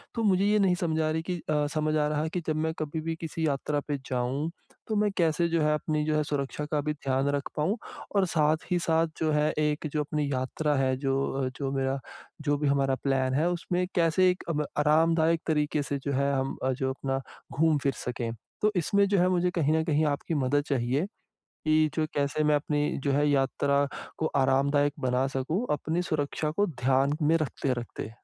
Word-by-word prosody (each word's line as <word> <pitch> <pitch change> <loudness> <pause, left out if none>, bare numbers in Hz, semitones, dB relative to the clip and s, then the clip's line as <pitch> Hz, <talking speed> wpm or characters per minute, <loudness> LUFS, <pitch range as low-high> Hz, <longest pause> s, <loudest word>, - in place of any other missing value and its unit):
तो 230 - -1
मुझे 195 -2 +3
ये 210 +1 +3
नहीं 190 -3 +3
समझा 160 -3 0
रही 160 +1 -1
कि 180 - 0
अ, 150 -1 +2
समझ 155 0 0
आ 150 -1 +2
रहा 150 0 0
है 160 - -2
कि 175 +2 -3
जब 155 - +1
मैं 160 - -1
कभी 155 +1 -3
भी 165 +1 -3
किसी 160 0 -2
यात्रा 145 +1 -1
पे 145 -1 -1
जाऊँ, 130 +5 -1 0.4
तो 220 - -1
मैं 210 0 +2
कैसे 170 -1 +2
जो 165 -1 +1
है, 150 0 +3
अपनी 150 0 -1
जो 155 0 +1
है, 150 - +2
सुरक्षा 145 0 -3
का 150 -2 +1
भी 150 +1 -1
ध्यान 135 -2 -1
रख 140 - -3
पाऊँ 170 +9 0 0.4
और 195 -1 +4
साथ 155 0 +2
ही 180 - +3
साथ 165 -1 +2
जो 155 -1 +1
है, 150 0 +2
एक 150 0 0
जो 150 - +1
अपनी 150 -1 -2
यात्रा 140 +4 -1
है, 130 -1 +2
जो 135 0 0 0.2
अ, - - 0
जो, 135 -2 -2
मेरा 135 0 -1 0.4
जो 145 -1 +1
भी 145 0 0
हमारा 135 -1 +2
प्लान 135 -1 +1
है 155 +5 +2
उसमें 175 +1 -1
कैसे 175 +1 +4
एक 180 - -2
अम 150 -2 0
आरामदायक 160 +2 +3
तरीक़े 150 -1 +1
से 140 0 -2
जो 140 +1 -3
है, 140 +1 +1
हम 135 0 -1
अ, 130 - +2
जो 130 +1 -1
अपना 135 0 -2 0.4
घूम 160 -1 +4
फिर 140 - +2
सकें। 120 -1 -3 0.3
तो 210 - +3
इसमें 200 +4 +3
जो 200 0 +2
है 180 - +4
मुझे 180 -1 +2
कहीं 155 -4 +1
न 160 0 +2
कहीं 155 -1 +2
आपकी 145 +2 -1
मदद 145 +1 +1
चाहिए, 135 +3 0 0.6
कि 155 0 +3
जो 155 -1 +1
कैसे 145 +2 0
मैं 150 0 +4
अपनी 145 0 0
जो 140 - +2
है, 145 +2 +3
यात्रा 140 +1 +2 0.3
को 160 - 0
आरामदायक 140 +2 +3
बना 130 +1 +1
सकूँ, 160 - -1
अपनी 160 +4 -1
सुरक्षा 150 -2 -1
को 205 +7 +1
ध्यान 135 -1 +1
में 155 +2 +4
रखते-रखते? 125 -7 -3
150 Hz, 210 wpm, -28 LUFS, 140-160 Hz, 0.6 s, और